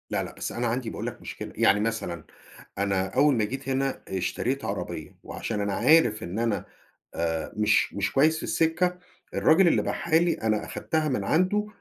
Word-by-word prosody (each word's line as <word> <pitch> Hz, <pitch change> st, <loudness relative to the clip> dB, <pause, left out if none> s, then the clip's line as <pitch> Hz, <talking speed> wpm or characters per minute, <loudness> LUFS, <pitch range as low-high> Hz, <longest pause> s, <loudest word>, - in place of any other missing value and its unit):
لأ، -, -, -1 dB
لأ، -, -, -8 dB
بس -, -, -4 dB
أنا 120 Hz, 0 st, -1 dB
عندي 120 Hz, 0 st, -2 dB
باقول -, -, -5 dB
لك -, -, -7 dB
مشكلة، -, -, -7 dB
يعني 100 Hz, -, +4 dB
مثلًا 105 Hz, -7 st, -2 dB, 0.5 s
أنا 95 Hz, -1 st, 0 dB
أوّل 145 Hz, -2 st, +5 dB
ما 110 Hz, -, +1 dB
جيت 135 Hz, +4 st, -5 dB
هنا 135 Hz, 0 st, -1 dB
اشتريت 120 Hz, +8 st, -2 dB
عربيّة، -, -, -5 dB
وعشان 105 Hz, -, -4 dB
أنا 100 Hz, -1 st, -1 dB
عارف 120 Hz, -2 st, +4 dB
إن 95 Hz, +6 st, -4 dB
أنا 115 Hz, -5 st, 0 dB, 0.5 s
آآ 80 Hz, -1 st, -2 dB
مش 105 Hz, 0 st, +2 dB
مش 100 Hz, -1 st, -1 dB
كويّس 155 Hz, +3 st, +3 dB
في -, -, -6 dB
السكة، 175 Hz, +2 st, +1 dB, 0.4 s
الراجل 175 Hz, +4 st, +5 dB
اللي -, -, +4 dB
باعها 165 Hz, -2 st, -1 dB
لي 175 Hz, 0 st, +2 dB
أنا 110 Hz, -1 st, -1 dB
أخدتها 155 Hz, -1 st, -1 dB
من 125 Hz, -7 st, -1 dB
عنده 185 Hz, -, +1 dB
120 Hz, 185 wpm, -26 LUFS, 100-155 Hz, 0.5 s, أوّل